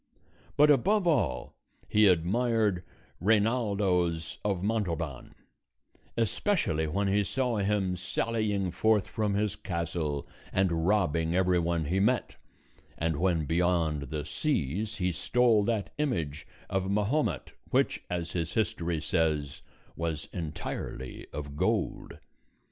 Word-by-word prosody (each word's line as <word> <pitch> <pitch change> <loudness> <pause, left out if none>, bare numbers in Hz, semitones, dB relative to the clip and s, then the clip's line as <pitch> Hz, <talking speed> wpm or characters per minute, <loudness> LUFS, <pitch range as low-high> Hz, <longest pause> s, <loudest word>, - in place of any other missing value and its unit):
But 150 +1 +7
above 190 - +3
all 140 - +1 0.3
he 105 0 +5
admired 100 +2 +2 0.4
Reinaldos 100 -5 +1
of 95 -3 -1
Montalban; 85 - -2 0.8
especially 115 - +1
when 100 +6 0
he 100 +1 +3
saw 125 +3 -1
him 100 -2 +1
sallying 100 +1 -1
forth 105 +3 +2
from 105 -2 -1
his 105 0 0
castle 85 -4 -3 0.2
and 85 -3 +1
robbing 85 -5 +2
every 90 -1 +3
one 85 -1 0
he 90 +6 0
met, 115 +2 +1 0.6
and 80 -1 0
when 85 -2 +1
beyond 80 -4 +1
the 75 0 -3
seas 105 - -1
he 90 -4 0
stole 115 +4 +3
that 110 -3 -1
image 80 - -2 0.2
of 95 -1 -1
Mahomet 105 - 0 0.2
which, - - +1
as 85 -2 -3
his 85 -2 -3
history 85 -6 0
says, 75 -4 0 0.3
was 80 -2 -3
entirely 75 -6 -5
of 70 -1 -6
gold. - - -1
95 Hz, 115 wpm, -29 LUFS, 80-105 Hz, 0.8 s, But